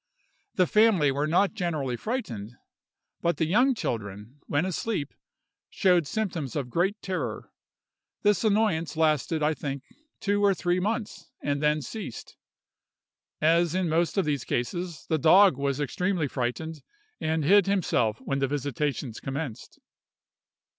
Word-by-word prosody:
The 185 - +4
family 200 -7 +4
were 145 +3 -1
not 180 +5 +2
generally 155 - -2
frightened, 120 - -4 0.7
but 170 0 +1
the 160 - +1
young 245 - +3
children, 105 - -5
when 145 +5 +1
asleep, 185 -4 -2 0.6
showed 180 -6 +3
symptoms 170 - -3
of 135 -5 -3
great 195 - +1
terror. 190 -1 -4 0.7
This 205 -1 +3
annoyance 200 -7 +1
lasted, 155 0 +1
I 155 +1 +3
think, 140 -3 -5 0.4
two 205 0 0
or 200 -1 +4
three 175 0 0
months, 210 -2 -3
and 145 0 -1
then 150 0 +2
ceased. 210 - -7 1.1
As 165 +2 +3
in 185 -2 0
most 165 +4 +1
of 195 - +2
these 145 -4 -1
cases, 170 +6 -3
the 160 - +1
dog 185 +3 +6
was 140 0 -1
extremely 170 +3 0
frightened, 140 +5 -3 0.4
and 160 0 0
hid 200 +3 +5
himself 125 - +1
when 135 +1 -2
the 135 - +1
visitations 140 -3 -2
commenced. 135 -3 -6
160 Hz, 135 wpm, -27 LUFS, 140-190 Hz, 1.1 s, dog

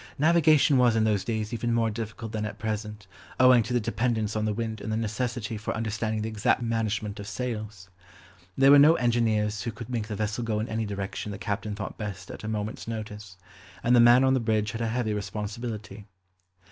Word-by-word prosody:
Navigation 155 -3 +4
was 120 -2 +4
in 110 - +3
those 105 -3 +1
days 110 -1 -3
even 120 0 -1
more 115 -1 +1
difficult 110 0 -6
than 110 -1 -3
at 105 - -5
present, 105 -1 -4 0.3
owing 130 -2 +7
to 115 +3 -5
the 125 - +2
dependence 110 -1 -1
on 110 0 0
the 110 - 0
wind 110 -2 -4
and 110 - -4
the 110 - 0
necessity 115 0 -3
for 110 - -4
understanding 110 -1 -2
the - - -2
exact 110 +2 +1
management 110 -2 -2
of 100 - -7
sails. 105 -5 -5 0.7
There 135 +1 +6
were 145 - +9
no 155 +3 +7
engineers 110 -4 +1
who 120 - -3
could 110 +3 -9
make 115 -3 -2
the 105 - -4
vessel 110 +2 -2
go 110 -2 -1
in 110 - -2
any 110 -1 -2
direction 100 +1 -4
the 100 - -6
captain 105 0 -3
thought 105 0 -6
best 105 -4 -6
at - - -9
a - - -5
moment's 110 0 -4
notice; 105 -3 -7 0.5
and 120 +1 +4
the - - +6
man 120 +2 +7
on 130 0 +4
the 130 - +2
bridge 110 -2 0
had 115 - -5
a 115 - 0
heavy 110 -1 -1
responsibility. 105 0 -5
110 Hz, 210 wpm, -27 LUFS, 105-120 Hz, 0.7 s, were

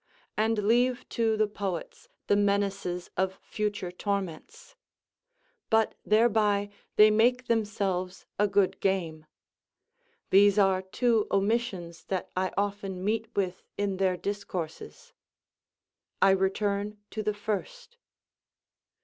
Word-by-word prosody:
and 220 +1 +1
leave 245 +3 +2
to 225 -2 +1
the 215 - +3
poets 200 -4 -5 0.2
the - - +3
menaces 200 -3 0
of 190 +1 0
future 205 -4 -3
torments. 190 -3 -5 0.9
But 220 -1 +3
thereby 210 -2 +3 0.2
they 215 0 +7
make 245 +4 +3
themselves 195 -5 -1
a 210 - +4
good 200 -1 +1
game. 165 -5 -1 1.0
These 200 +1 +6
are 195 -2 +4
two 225 +3 +1
omissions 195 -4 -1
that 190 -2 -3
I 185 0 0
often 200 -2 -2
meet 225 +1 0
with 185 -2 -1 0.2
in 200 -2 -1
their 185 -1 +1
discourses. 200 - -6 1.1
I 195 - +6
return 200 +2 0
to 215 - -3
the 210 0 -1
first. 475 - -5
205 Hz, 110 wpm, -28 LUFS, 190-215 Hz, 1.1 s, they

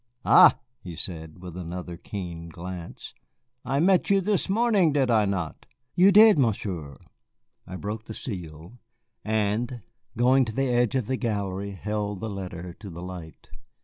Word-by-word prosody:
"Ah," - - +8 0.2
he 90 -8 -9
said, 80 0 -6
with 90 -2 -8
another 90 0 -6
keen 85 -2 -7
glance, 85 +1 -8 0.5
"I 135 +3 -1
met 185 +3 +3
you 200 0 +5
this 200 0 0
morning, 205 -6 +3
did 135 -4 +2
I 110 -2 +4
not?" 95 -5 -4 0.3
"You 190 +3 +6
did, 210 -3 +7
Monsieur." 95 - -1 0.7
He 95 - -6
broke 105 +4 -5
the 110 - -8
seal, 85 - -7 0.4
and, 110 +2 -1 0.3
going 130 +3 +4
to 110 - -6
the 135 -1 0
edge 120 0 +2
of 130 -4 0
the 130 +3 -2
gallery, 100 -4 -3
held 105 0 -3
the 110 +1 -4
letter 90 -3 -6
to 100 - -9
the 85 0 -8
light. 90 -4 -10
105 Hz, 155 wpm, -26 LUFS, 90-125 Hz, 0.7 s, Ah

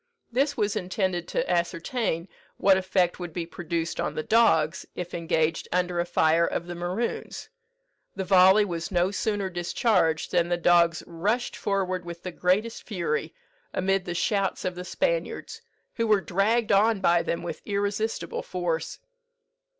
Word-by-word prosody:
This 280 +4 +1
was 210 -2 0
intended 180 -2 -1
to - - -1
ascertain 170 +1 -1 0.3
what 195 -1 +5
effect 185 -2 +1
would 175 -1 -5
be 170 -1 -3
produced 170 -1 -4
on - - -2
the 155 - -2
dogs 180 -7 +3
if 175 -1 -5
engaged 165 -1 0
under 180 -1 0
a 175 - 0
fire 165 -1 +3
of 170 - -3
the 175 - -6
Maroons. 180 +7 -4 0.7
The 190 - -2
volley 190 +2 +6
was 170 -4 -4
no 180 0 +1
sooner 205 -1 -1
discharged 175 -2 +1
than 175 -1 +2
the 175 - +1
dogs 170 -1 +3
rushed 205 +9 -1
forward 185 -2 -1
with 170 0 -8
the 185 - -4
greatest 190 +7 0
fury, 170 -6 -3 0.4
amid 195 0 +1
the 175 - -4
shouts 195 +2 0
of 185 - -1
the 180 +1 -7
Spaniards, - - -2 0.3
who 230 -1 -1
were 210 -2 +4
dragged 205 +5 +1
on 210 +2 +4
by 175 -2 +3
them 170 - -3
with 175 - -5
irresistible 205 +2 -2
force. 175 -3 -3
180 Hz, 155 wpm, -26 LUFS, 170-205 Hz, 0.7 s, volley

